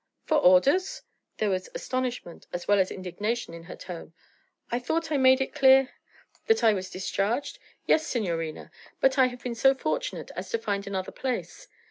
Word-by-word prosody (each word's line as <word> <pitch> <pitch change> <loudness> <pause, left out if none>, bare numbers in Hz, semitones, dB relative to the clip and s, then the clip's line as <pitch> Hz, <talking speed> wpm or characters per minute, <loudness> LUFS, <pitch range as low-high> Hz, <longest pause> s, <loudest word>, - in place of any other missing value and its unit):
'For 310 - +2
orders!' 290 - +4 0.3
There 215 -2 0
was 185 -1 -2
astonishment 250 -9 -4
as 175 0 -5
well 205 -1 +4
as 190 - +2
indignation 205 +3 -4
in 165 0 -10
her 180 - -9
tone. 170 -2 -9 0.6
'I 240 - 0
thought 320 +6 -2
I 295 - +2
made 260 0 +5
it 265 - -2
clear 265 -1 +5 0.3
' - - -32
'That 450 - +3
I 220 -1 +6
was 190 -2 -4
discharged? 200 +8 -2 0.3
Yes, 315 +1 +3
signorina. 165 -9 -3 0.3
But 270 0 +3
I 260 - +6
have 245 -1 -9
been 245 - -3
so 270 +4 +4
fortunate - - -3
as - - -6
to 460 - 0
find 200 - -3
another 190 -1 -3
place. 265 - -4
240 Hz, 180 wpm, -27 LUFS, 185-270 Hz, 0.6 s, I